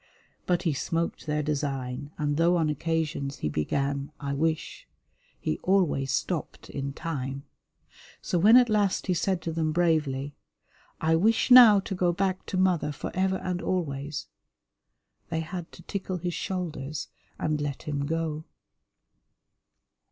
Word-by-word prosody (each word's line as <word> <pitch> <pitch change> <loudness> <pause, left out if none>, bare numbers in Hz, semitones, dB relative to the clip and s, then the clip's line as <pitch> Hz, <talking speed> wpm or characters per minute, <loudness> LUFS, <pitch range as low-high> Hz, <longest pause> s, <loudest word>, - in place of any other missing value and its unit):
But 180 -1 +1
he 165 -5 +1
smoked 165 +4 -2
their 150 0 0
design, 140 -3 -3
and 145 -1 0
though 170 +2 +4
on 160 -2 +2
occasions 150 -2 -2
he - - +1
began, 140 - -1
"I 140 -1 -3
wish 160 +2 -2 0.3
" - - -38
he 75 - -2
always 175 -9 +2
stopped 160 +4 -3
in 140 0 -3
time. 140 -3 -4 0.8
So 175 - -1
when 215 +7 +8
at 250 -1 +6
last 210 -3 +1
he 185 - +1
said 175 0 0
to 165 - -2
them 160 -1 0
bravely, 150 -5 +1 0.7
"I 160 +1 +3
wish 220 +8 +2
now 235 -5 +10
to 190 - -5
go 180 -1 +2
back 185 +1 -1
to 185 - -2
mother 185 -5 +2
for 145 - -5
ever 190 +1 +1
and 180 -1 -3
always," 145 -5 -2 1.0
they 160 -1 -1
had 175 +1 -6
to - - -13
tickle 190 -2 -3
his 175 0 -3
shoulders 155 -7 -4 0.3
and 155 -1 -1
let 145 -2 -3
him 145 -3 -2
go. 160 -1 -2
160 Hz, 150 wpm, -27 LUFS, 145-180 Hz, 1.0 s, now